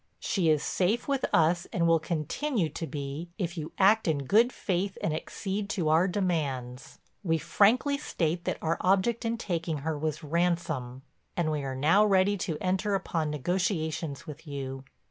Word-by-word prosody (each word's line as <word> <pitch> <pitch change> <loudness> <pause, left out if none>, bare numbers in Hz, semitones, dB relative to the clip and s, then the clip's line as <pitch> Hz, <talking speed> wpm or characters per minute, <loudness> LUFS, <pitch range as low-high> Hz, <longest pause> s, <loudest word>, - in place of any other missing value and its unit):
She 180 -5 +1
is 155 -2 +3
safe 200 +6 0
with 275 -2 +1
us 170 +2 +3
and 170 - +1
will 165 -1 +5
continue 170 - -1
to 160 +2 -5
be 145 +3 -5
if 175 -2 -3
you 155 -2 -5
act 210 +2 +4
in 145 -4 0
good 230 - +4
faith 190 -2 -2
and 160 - -1
accede 200 +5 -4
to 170 -6 0
our 165 +4 +4
demands. 145 -10 -2 0.2
We 165 -5 +1
frankly 215 - +3
state 170 - -2
that - - -1
our 165 +1 0
object 200 +6 +2
in 230 0 0
taking 165 -7 -2
her 160 -1 0
was 155 0 -3
ransom 160 -6 -1 0.3
and 165 -3 +1
we 150 -1 -1
are 135 -1 -4
now 160 +10 +4
ready 200 -1 +3
to 165 -4 -3
enter 190 +2 0
upon 165 -5 -1
negotiations 160 -1 -2
with 150 +1 -10
you. 135 -2 -5
170 Hz, 170 wpm, -28 LUFS, 155-195 Hz, 0.3 s, will